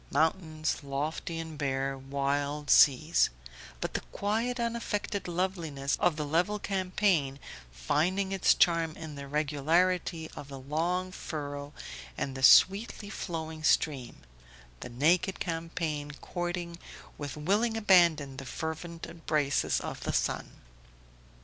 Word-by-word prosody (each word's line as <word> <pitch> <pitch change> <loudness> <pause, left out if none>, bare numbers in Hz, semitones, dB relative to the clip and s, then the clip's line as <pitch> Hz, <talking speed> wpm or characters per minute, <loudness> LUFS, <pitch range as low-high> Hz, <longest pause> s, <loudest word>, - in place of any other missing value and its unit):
mountains, 160 -2 0
lofty 150 +4 -3
and 160 -2 -6
bare, 135 -1 -1
wild 140 +2 -1
seas 155 +4 +5 0.5
but - - -3
the - - -1
quiet 225 +5 -1
unaffected 230 -4 -2
loveliness 170 -6 -1
of 175 -3 +3
the 150 -1 -3
level 175 +8 +1
champaign, 185 -8 0 0.3
finding 170 - 0
its 195 -1 +4
charm 165 -2 +2
in 160 -2 -7
the 140 -1 -7
regularity 160 +4 +1
of 140 - -8
the 140 -1 -8
long 170 +7 -1
furrow 145 -5 -5 0.5
and 135 -1 -3
the 130 - -5
sweetly 200 - +5
flowing 160 -5 -5
stream 135 - +1 0.6
the - - -7
naked 165 +10 +2
champaign 165 -3 -3
courting 175 -1 -4 0.4
with 145 0 -5
willing 210 +9 +1
abandon 170 -10 +4
the 135 - -7
fervent 165 +4 -5
embraces 155 -4 0
of - - -5
the - - -3
sun. - - -1
160 Hz, 120 wpm, -30 LUFS, 145-180 Hz, 0.6 s, seas